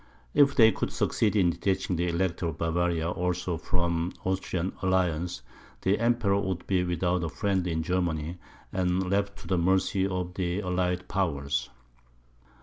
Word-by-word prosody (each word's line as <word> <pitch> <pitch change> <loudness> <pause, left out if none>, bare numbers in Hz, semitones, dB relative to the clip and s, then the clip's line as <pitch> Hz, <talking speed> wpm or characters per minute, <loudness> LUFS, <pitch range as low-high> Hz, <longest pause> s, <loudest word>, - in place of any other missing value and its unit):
If 140 -1 +5
they 110 -3 +7
could - - -3
succeed 110 -1 +1
in 90 -4 +4
detaching 95 +1 -1
the 85 +1 0
Elector 85 0 0
of 80 -2 -4
Bavaria 85 0 0
also 90 0 -1
from 85 0 -1
the 95 - 0
Austrian 95 -1 -2
alliance, 90 -2 0 0.4
the 95 +2 +2
Emperor 115 -4 +2
would 95 -3 -3
be 95 -2 +1
without 90 0 0
a 80 - -1
friend 95 0 0
in 80 -2 -1
Germany 85 -1 -1 0.3
and 90 0 +1
left 100 0 0
to - - -11
the 95 -2 +1
mercy 95 +2 +2
of 90 -2 -3
the 90 0 -1
allied 90 -1 -1
powers. 70 -7 -1
90 Hz, 155 wpm, -28 LUFS, 85-95 Hz, 0.4 s, they